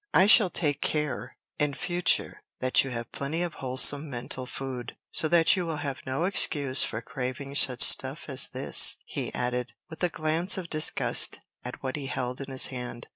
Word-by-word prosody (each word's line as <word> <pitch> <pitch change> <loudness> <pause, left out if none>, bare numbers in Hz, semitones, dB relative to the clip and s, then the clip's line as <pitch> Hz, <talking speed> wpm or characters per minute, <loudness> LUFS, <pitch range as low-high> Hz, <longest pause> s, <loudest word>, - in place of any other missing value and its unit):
I 190 - +6
shall 210 -2 +7
take 145 -4 -1
care 150 -5 -3 0.2
in 150 -2 0
future 175 0 0 0.2
that 130 0 +3
you 135 - -6
have 120 -1 -6
plenty 155 +5 -3
of 175 - -4
wholesome 140 +3 +3
mental 125 0 -5
food, 130 -3 -6
so 155 - +3
that 165 0 +4
you 185 - -2
will 165 -2 -4
have 140 -3 -6
no 130 +5 -2
excuse 145 -8 +2
for 110 +1 -4
craving 130 +3 -6
such 130 -3 +4
stuff - - +4
as - - +1
this," - - +3
he - - -5
added, 125 0 -3 0.2
with 160 - -7
a 180 - +3
glance 160 +4 0
of 180 -3 -7
disgust 155 0 +1 0.2
at 125 +2 -9
what 130 +2 -3
he 140 -2 -6
held 125 0 -4
in 135 - -7
his 130 -1 +1
hand. 125 -2 -7
140 Hz, 185 wpm, -27 LUFS, 125-160 Hz, 0.2 s, shall